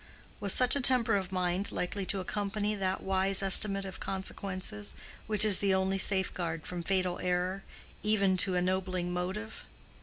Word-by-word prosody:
Was 200 -1 0
such 250 +5 +5
a 280 - 0
temper 245 -3 +3
of 190 -2 -2
mind 185 +1 -1
likely 190 +1 -3
to 195 - -1
accompany 205 +2 -2
that 190 -2 -2
wise 190 +1 +1
estimate 195 +1 +6
of 190 -1 -8
consequences 185 - -4 0.3
which 215 0 +1
is 205 -3 +4
the 195 -1 +2
only 190 +1 0
safeguard 180 -4 -1
from 180 -1 -5
fatal 185 0 -1
error, 180 +2 -1 0.4
even 200 -3 +2
to 185 0 +2
ennobling 180 0 -1
motive? 190 +5 -5
190 Hz, 155 wpm, -30 LUFS, 185-200 Hz, 0.4 s, estimate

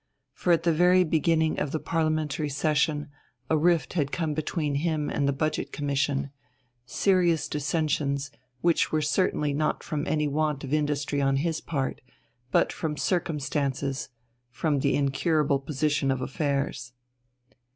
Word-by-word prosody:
For 180 - 0
at 165 -1 +3
the 170 -1 +3
very 180 +3 +5
beginning 160 -1 +1
of 150 - -1
the 155 - -1
Parliamentary 155 -2 -1
session 150 +1 0 0.4
a - - +5
rift 165 +1 +2
had 145 -5 0
come 160 -3 -1
between 155 0 -2
him 155 -3 -1
and 140 - 0
the - - +3
Budget 155 +3 -2
Commission 140 -1 -1 0.6
serious 175 -4 +2
dissensions, 145 -2 -1 0.3
which 170 -1 +2
were 155 -1 +1
certainly 150 -2 +1
not 155 +2 -1
from 150 -1 -3
any 150 -1 +1
want 150 0 -1
of 135 +1 -4
industry 145 -1 0
on 135 0 +2
his 160 +3 -1
part, 135 -4 -3 0.5
but - - +2
from 155 -2 -3
the - - -9
circumstances, 140 -5 -1 0.4
from 145 +3 0
the 140 +1 +1
incurable 145 +1 +1
position 145 0 0
of 135 -1 +1
affairs. 135 -3 -2
150 Hz, 145 wpm, -27 LUFS, 140-160 Hz, 0.6 s, very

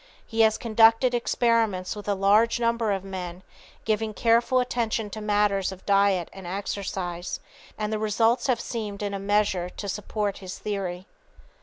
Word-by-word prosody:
He 225 - -6
has 220 -1 +4
conducted 225 +2 +4
experiments 230 -6 +1
with 210 -1 -9
a 205 - +1
large 205 +5 +3
number 230 -2 +1
of 195 -1 -1
men, 185 -2 -6 0.4
giving 215 0 -1
careful 235 +2 +3
attention 230 -4 -1
to 215 - -6
matters 205 -2 +1
of 190 0 -11
diet 195 -3 +3
and 190 -2 -9
exercise, 185 -2 -4 0.4
and 215 0 -2
the 215 - -1
results 225 +4 +2
have 250 -3 +2
seemed 210 -4 -5
in 200 -1 -2
a 200 - -3
measure 200 -3 +1
to 200 - -7
support 205 0 -3
his 185 -1 -7
theory. 190 -3 -4
210 Hz, 160 wpm, -26 LUFS, 195-225 Hz, 0.4 s, has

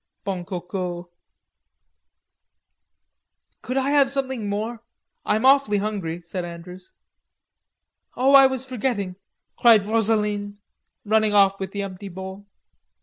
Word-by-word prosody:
Bon 185 -3 -3
Coco." 180 0 -5 2.5
"Could 255 - -4
I 270 +1 +1
have 280 -2 +4
something 265 -6 -1
more, 220 +3 -4 0.5
I'm 215 +4 +1
awfully 270 -6 +4
hungry," 195 -5 -4
said 180 +2 -5
Andrews. 175 +2 -10 1.3
"Oh, 265 +2 +3
I 270 -1 +9
was 265 -1 -1
forgetting," 225 -7 -3 0.4
cried 225 -4 +6
Rosaline, 210 -2 0 0.5
running 215 0 +2
off 195 -1 +4
with 190 -1 -5
the 200 0 -3
empty 195 0 -8
bowl. 190 +2 -9
205 Hz, 110 wpm, -23 LUFS, 190-240 Hz, 2.5 s, I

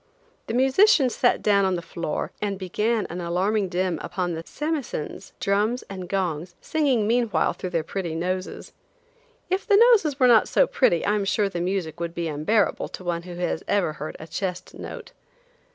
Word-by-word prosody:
The 225 - -2
musicians 265 - +4
sat 245 - +2
down 200 -2 +4
on 190 -1 +2
the 170 - -3
floor 165 -2 -4
and 200 -2 -1
began 210 +4 0
an 175 +1 -4
alarming 190 +4 0
din 180 -2 -1
upon 180 -2 -2
samisens, 295 - -4
drums 210 +5 +1
and 185 -2 -7
gongs, 175 -3 -2
singing 275 -9 +1
meanwhile 230 0 +1
through 185 - -5
their 165 -3 -1
pretty 170 -1 -4
noses. 185 +2 -4 0.8
If 375 +1 0
the 405 -2 +6
noses 410 - +5
were 255 - +5
not 235 -3 +6
so - - +4
pretty 175 - +2
I 205 - +2
am 205 -2 0
sure 200 0 +1
the 175 -3 -4
music 175 -3 -2
would 170 0 -4
be 170 -1 -2
unbearable 160 +8 +1
to - - -9
one 170 -1 -2
who 175 0 -9
has 175 -2 -2
ever 195 -6 +1
heard 155 0 -6
a 160 - -8
chest 180 +2 -4
note. - - -8
195 Hz, 180 wpm, -24 LUFS, 175-230 Hz, 0.8 s, the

